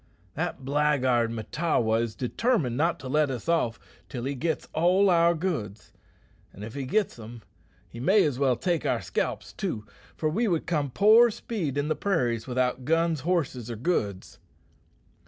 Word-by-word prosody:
"That 160 -4 -4
blackguard 135 -5 +2
Mahtawa 115 -1 0
is 115 -2 -3
determined 140 - 0
not 165 +6 +1
to 130 - -7
let 150 +2 +2
us 125 0 -5
off 160 -9 +1 0.3
till 120 -3 -5
he 135 +2 -2
gits 160 +4 -2
all 185 +4 +4
our 170 0 +4
goods; 130 - -4 0.6
an' 100 - -11
if 110 - -7
he 140 -1 -4
gits 205 +6 0
them, 115 0 -10 0.4
he 115 - -11
may 195 - +4
as 145 -6 -1
well 135 -3 +3
take 175 +1 -1
our - - 0
scalps - - -3
too, 105 -1 -4 0.3
for 155 - 0
we 215 +10 0
would 170 -5 0
come 150 -4 -1
poor 220 - +6
speed 185 - -4
in 145 +1 0
the 155 - 0
prairies 125 - -1
without 125 0 -1
guns, 165 +2 +1
horses, 135 -7 -1
or 120 - -4
goods." 105 - -2
145 Hz, 170 wpm, -27 LUFS, 120-170 Hz, 0.6 s, poor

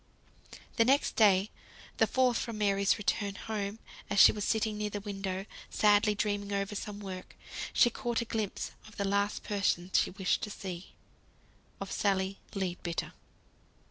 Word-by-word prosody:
The 230 - +6
next 270 +4 +2
day, 200 -3 +4 0.5
the - - +4
fourth 255 -3 +2
from 230 -2 -4
Mary's 200 -1 +2
return 200 -1 -1
home, 205 -1 -4 0.3
as 200 - +1
she - - +10
was 210 - -4
sitting 220 0 +1
near 210 0 -2
the 205 - -4
window, 195 -2 -4 0.2
sadly 210 0 +4
dreaming 205 -1 -1
over 200 0 -1
some 205 0 -5
work, 190 -2 -8 0.4
she 240 - +5
caught 235 0 -2
a 235 - -2
glimpse 220 -3 -3 0.2
of 215 - -15
the 200 - 0
last 200 +1 0
person 190 -3 0
she - - +4
wished 190 -1 0
to 210 - -3
see 185 -3 -7 0.8
of 195 - -6
Sally 195 -2 0 0.2
Leadbitter! 180 -3 -3
205 Hz, 155 wpm, -31 LUFS, 195-215 Hz, 0.8 s, she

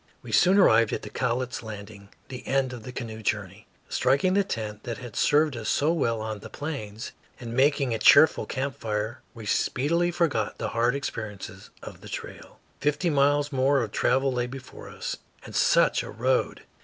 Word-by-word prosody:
We - - -8
soon 185 +2 +5
arrived 115 - +5
at - - -3
the - - -8
Cowlitz 125 +1 -2
landing, 105 -2 -9 0.2
the 130 -1 -8
end 135 -1 +1
of 120 - -7
the 125 - -8
canoe 115 -3 -6
journey. 105 0 -3 0.2
Striking 140 +9 +2
the 200 +1 +3
tent 110 - -5
that 115 -2 -4
had 115 0 -9
served 150 +2 +3
us 110 -2 -4
so 150 +3 +2
well 115 -9 0
on 110 -1 -4
the - - -10
Plains 120 -8 -6 0.3
and 115 -2 -6
making 135 -1 +2
a 110 - -2
cheerful 145 +7 +6
camp 135 +1 -3
fire, 110 +2 -3
we 115 -2 -9
speedily 165 - +1
forgot 155 -11 0
the - - -3
hard 120 +3 +1
experiences 105 -7 -6
of - - -10
the - - -11
trail. - - -8 0.2
Fifty 150 +4 +1
miles 145 +1 +2
more 135 0 +2
of 110 - -5
travel 135 +4 +2
lay 125 0 -1
before 130 0 -10
us. - - -5 0.3
And - - -9
such - - +4
a - - -8
road! - - 0
125 Hz, 185 wpm, -26 LUFS, 110-140 Hz, 0.3 s, cheerful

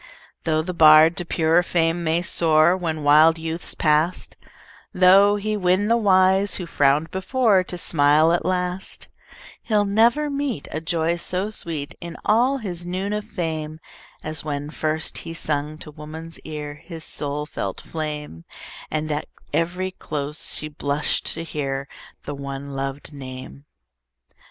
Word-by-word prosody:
Tho' 155 -1 +1
the 180 +2 -4
bard 155 0 +7
to 175 - -2
purer 165 +1 +3
fame 170 -1 0
may 165 +2 +1
soar, 165 0 +4
When 160 -4 -3
wild 155 +3 +6
youth's 165 +1 -5
past; 155 +3 +1 0.6
Tho' 195 +3 +6
he 215 +1 -2
win 190 +1 +1
the 230 - +5
wise, 195 -2 +3
who 180 - -3
frowned 145 0 +2
before, 200 0 +2
To 180 - -6
smile 155 0 +3
at 175 - 0
last; 180 0 -3 0.5
He'll 210 -2 +1
never 230 +9 +3
meet 280 - -3
A 155 - -3
joy 165 +1 0
so 185 +4 -1
sweet, 155 -8 -4
In 170 -1 -7
all 245 +6 +3
his 180 -8 -5
noon 185 +3 -3
of 210 0 -3
fame, 155 -2 -4 0.4
As 155 +1 -3
when 145 -1 -4
first 155 0 -2
he 165 0 -7
sung 150 -1 -2
to 155 - -10
woman's 155 +2 -9
ear 150 -2 -6
His 165 -3 -8
soul 145 -1 -4
felt - - -5
flame, 150 - -6 0.5
And, 155 0 -2
at 150 0 -2 0.3
every 180 +3 -1
close, 150 -4 -3
she 155 - -4
blushed 145 0 -1
to 165 - -5
hear 140 -4 -3 0.4
The 145 - -5
one 140 0 -6
lov'd 135 +2 -5
name. 130 0 -9
165 Hz, 150 wpm, -23 LUFS, 150-185 Hz, 0.6 s, bard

